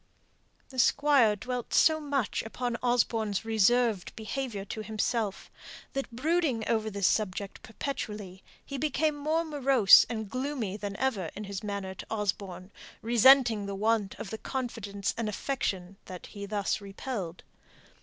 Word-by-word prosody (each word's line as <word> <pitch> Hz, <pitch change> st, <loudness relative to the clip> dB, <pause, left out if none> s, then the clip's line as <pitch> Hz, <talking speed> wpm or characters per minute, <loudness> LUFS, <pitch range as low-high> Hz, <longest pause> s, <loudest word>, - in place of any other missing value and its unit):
The 260 Hz, -, -6 dB
Squire 270 Hz, -5 st, +4 dB
dwelt 245 Hz, +3 st, -4 dB
so 315 Hz, -1 st, +5 dB
much 280 Hz, -6 st, -1 dB
upon 240 Hz, +2 st, -3 dB
Osborne's 225 Hz, -4 st, +1 dB
reserved 225 Hz, -1 st, +2 dB
behaviour 220 Hz, -2 st, -4 dB
to 215 Hz, +2 st, -5 dB
himself, 215 Hz, -1 st, -2 dB, 0.4 s
that 275 Hz, 0 st, -3 dB
brooding 270 Hz, -1 st, 0 dB
over 220 Hz, -2 st, +1 dB
this 200 Hz, -2 st, -1 dB
one 215 Hz, -1 st, +1 dB
subject 195 Hz, +2 st, -7 dB
perpetually 210 Hz, -7 st, -6 dB, 0.2 s
he 280 Hz, -1 st, -5 dB
became 305 Hz, +1 st, +1 dB
more 310 Hz, +3 st, 0 dB
morose 270 Hz, -, +6 dB
and 220 Hz, -2 st, -3 dB
gloomy 255 Hz, -4 st, -3 dB
than 205 Hz, -1 st, -5 dB
ever 215 Hz, -11 st, -1 dB
in 210 Hz, -, -5 dB
his 200 Hz, -2 st, -5 dB
manner 200 Hz, -2 st, -4 dB
to -, -, -10 dB
Osborne, 195 Hz, -3 st, -3 dB, 0.3 s
resenting 235 Hz, -2 st, +5 dB
the 200 Hz, -, -4 dB
want 210 Hz, -1 st, +1 dB
of 195 Hz, -, -7 dB
the 220 Hz, -, -5 dB
confidence 210 Hz, -6 st, -3 dB
and 225 Hz, -2 st, -1 dB
affection 195 Hz, -5 st, -3 dB
that 180 Hz, -2 st, -9 dB
he 200 Hz, -1 st, -8 dB
thus 205 Hz, 0 st, -1 dB
repelled. 195 Hz, -3 st, -6 dB
220 Hz, 145 wpm, -29 LUFS, 200-260 Hz, 0.4 s, morose